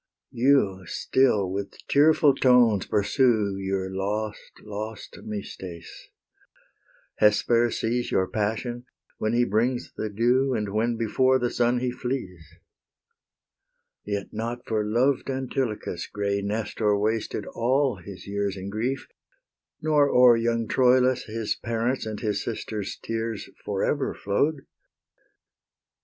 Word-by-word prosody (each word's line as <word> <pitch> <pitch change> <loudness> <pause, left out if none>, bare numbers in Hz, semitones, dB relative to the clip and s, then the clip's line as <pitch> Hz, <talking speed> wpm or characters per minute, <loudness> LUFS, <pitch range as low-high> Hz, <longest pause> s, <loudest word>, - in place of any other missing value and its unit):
You 120 -7 +2
still 105 -7 +1
with 100 +1 -5
tearful 150 0 +5
tones 125 -6 +4
pursue 105 -2 +2
Your 95 -1 -2
lost, 105 +2 -3
lost 105 +1 -7
Mystes; 95 -4 -8 1.1
Hesper 115 +3 +4
sees 120 +2 -1
Your 95 - +1
passion 115 +4 -2 0.3
when 110 +1 0
he 120 +1 +3
brings 120 +5 0
the 110 - -3
dew, 125 +5 +2
And 105 -2 -2
when 115 +2 0
before 130 +4 +2
the 120 -1 -1
sun 120 0 +1
he 125 -1 0
flees. 120 - -5 1.5
Yet 100 -1 -3
not 115 +3 -4
for 110 -2 0
loved 125 +6 +1
Antilochus 130 -9 -3
Grey 100 -1 -2
Nestor 105 0 0
wasted 110 0 -1
all 130 0 +1
his 90 +2 -10
years 100 -1 -2
In 95 +1 -6
grief; 125 +6 -2 0.8
nor 150 -2 +4
o'er 125 -2 +7
young 115 0 0
Troilus 125 0 +3
His 110 0 -2
parents' 115 +1 -1
and 110 -1 -4
his 105 -3 -1
sisters' 110 -2 -4
tears 115 -2 -3 0.2
For 100 -2 -2
ever 145 -2 0
flow'd. 140 +8 0
115 Hz, 120 wpm, -25 LUFS, 100-125 Hz, 1.5 s, o'er